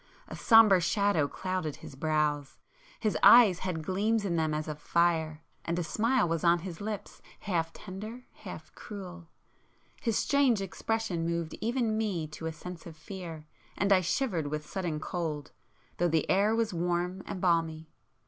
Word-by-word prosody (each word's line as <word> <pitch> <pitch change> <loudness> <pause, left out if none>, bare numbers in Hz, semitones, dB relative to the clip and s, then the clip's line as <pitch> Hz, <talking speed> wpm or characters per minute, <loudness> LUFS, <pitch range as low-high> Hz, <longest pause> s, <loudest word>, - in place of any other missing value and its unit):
A - - -7
sombre 220 -5 +6
shadow 185 -3 +2
clouded 185 -3 -3
his - - -11
brows,—his 155 - -2
eyes 215 -7 +8
had 175 -4 -3
gleams 205 +5 0
in 175 -3 0
them 160 -1 +1
as 155 +1 -2
of 150 -1 -5
fire,—and 165 0 -1
a 175 - 0
smile 220 +7 +1
was 165 -1 -1
on 170 0 +5
his 175 -2 -7
lips, 210 -1 -6 0.2
half 165 -5 -1
tender, 215 +6 -8
half - - -10
cruel. 180 -5 -9 0.7
His 230 -4 0
strange 275 -6 +3
expression 195 -1 -2
moved 170 -1 -2
even 230 -1 0
me 195 -8 -1
to 160 +1 -6
a - - -2
sense 170 +2 -9
of 160 -2 -11
fear, 165 -3 -8 0.3
and 200 +1 +3
I 185 - +4
shivered 180 - -1
with 150 +1 -4
sudden 170 -3 -3
cold, 155 -3 -4 0.5
though 175 0 +2
the 160 -1 +1
air 205 +3 +3
was 225 -3 0
warm 175 +2 -1
and 200 - -5
balmy. 165 -3 0
175 Hz, 160 wpm, -30 LUFS, 160-205 Hz, 0.7 s, eyes